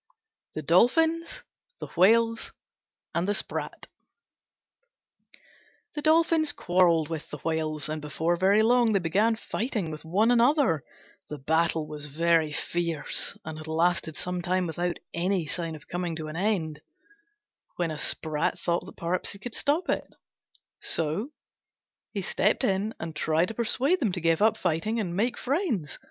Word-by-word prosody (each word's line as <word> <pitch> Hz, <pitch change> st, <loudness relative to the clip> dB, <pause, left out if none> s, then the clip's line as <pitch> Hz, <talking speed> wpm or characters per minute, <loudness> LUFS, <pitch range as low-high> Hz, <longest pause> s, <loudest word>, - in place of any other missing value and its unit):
THE 155 Hz, -, -4 dB
DOLPHINS, 320 Hz, -, +2 dB, 0.4 s
THE -, -, -5 dB
WHALES, 230 Hz, +5 st, +3 dB, 0.6 s
AND 170 Hz, +2 st, 0 dB
THE 205 Hz, -, +1 dB
SPRAT -, -, -3 dB, 2.1 s
The 295 Hz, -, -4 dB
Dolphins 320 Hz, -1 st, +3 dB
quarrelled 175 Hz, -3 st, +2 dB
with 160 Hz, -2 st, -5 dB
the -, -, -6 dB
Whales, 155 Hz, -2 st, -1 dB
and 155 Hz, 0 st, -4 dB
before 160 Hz, +3 st, -1 dB
very 195 Hz, +5 st, +4 dB
long 235 Hz, -1 st, +4 dB
they -, -, +4 dB
began 200 Hz, +7 st, +2 dB
fighting 220 Hz, -5 st, -3 dB
with 155 Hz, -, -7 dB
one 200 Hz, +8 st, +2 dB
another. 245 Hz, -, +3 dB, 0.5 s
The 150 Hz, -, -5 dB
battle 160 Hz, +3 st, +1 dB
was 150 Hz, -1 st, -5 dB
very 165 Hz, +1 st, +2 dB
fierce, 170 Hz, 0 st, -1 dB
and 160 Hz, 0 st, -6 dB
had 155 Hz, -, -9 dB
lasted 165 Hz, 0 st, +1 dB
some 180 Hz, 0 st, -3 dB
time 185 Hz, +1 st, 0 dB
without 175 Hz, +1 st, -2 dB, 0.2 s
any 180 Hz, 0 st, 0 dB
sign 165 Hz, +1 st, -3 dB
of 150 Hz, -, -13 dB
coming 175 Hz, -1 st, -3 dB
to 155 Hz, -1 st, -5 dB
an 155 Hz, -, -7 dB
end, 170 Hz, -5 st, -1 dB, 0.9 s
when 175 Hz, -2 st, -1 dB
a 155 Hz, -, -5 dB
Sprat 155 Hz, -2 st, -1 dB
thought 170 Hz, 0 st, -1 dB
that -, -, -12 dB
perhaps 175 Hz, +4 st, -1 dB
he -, -, -10 dB
could 225 Hz, +3 st, -7 dB
stop 310 Hz, +6 st, 0 dB
it; -, -, -2 dB, 0.6 s
so 165 Hz, -, -1 dB, 0.8 s
he 200 Hz, -3 st, -3 dB
stepped 210 Hz, +4 st, +1 dB
in 200 Hz, +3 st, 0 dB
and 160 Hz, -1 st, -6 dB
tried 160 Hz, +3 st, +1 dB
to -, -, -5 dB
persuade 260 Hz, -, +1 dB
them 225 Hz, -8 st, +1 dB
to 180 Hz, -, -1 dB
give 165 Hz, 0 st, +2 dB
up 220 Hz, +1 st, +4 dB
fighting 185 Hz, +7 st, -1 dB
and 180 Hz, -5 st, -2 dB
make 235 Hz, +5 st, 0 dB
friends. 260 Hz, -, -2 dB
175 Hz, 155 wpm, -27 LUFS, 160-220 Hz, 2.1 s, very